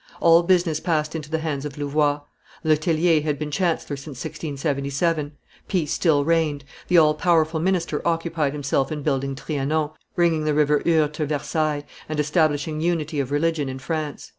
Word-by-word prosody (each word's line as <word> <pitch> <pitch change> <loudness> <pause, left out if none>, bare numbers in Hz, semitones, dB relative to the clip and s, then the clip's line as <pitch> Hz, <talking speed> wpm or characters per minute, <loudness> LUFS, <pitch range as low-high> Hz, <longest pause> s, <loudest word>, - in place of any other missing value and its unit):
All 165 0 +6
business 170 -3 +2
passed 155 -3 -1
into 155 -2 -5
the 160 - 0
hands 155 -4 -3
of 150 -2 -6
Louvois. 145 0 +1 0.4
Le 155 -1 +4
Tellier 160 +1 +2
had 150 -1 -1
been 150 0 -4
chancellor 165 -3 -1
since 140 -1 -9
1677; 145 0 -2 0.3
peace 170 -7 0
still 145 -5 +2
reigned; 160 -3 +1 0.2
the 180 - +4
all 155 -2 +6
powerful 160 0 +2
minister 170 -3 0
occupied 165 -3 0
himself 140 0 -1
in 150 -2 -4
building 135 -2 -1
Trianon, 150 +2 -1 0.2
bringing 170 -3 +2
the 155 -1 +1
River 150 -1 +3
Eure 155 -3 +3
to 150 0 -2
Versailles, 150 0 -1 0.3
and 155 -1 -2
establishing 150 0 +1
unity 160 -3 -1
of 135 -2 -1
religion 150 -1 0
in 130 - -5
France. 155 +1 -4
155 Hz, 165 wpm, -23 LUFS, 145-165 Hz, 0.4 s, All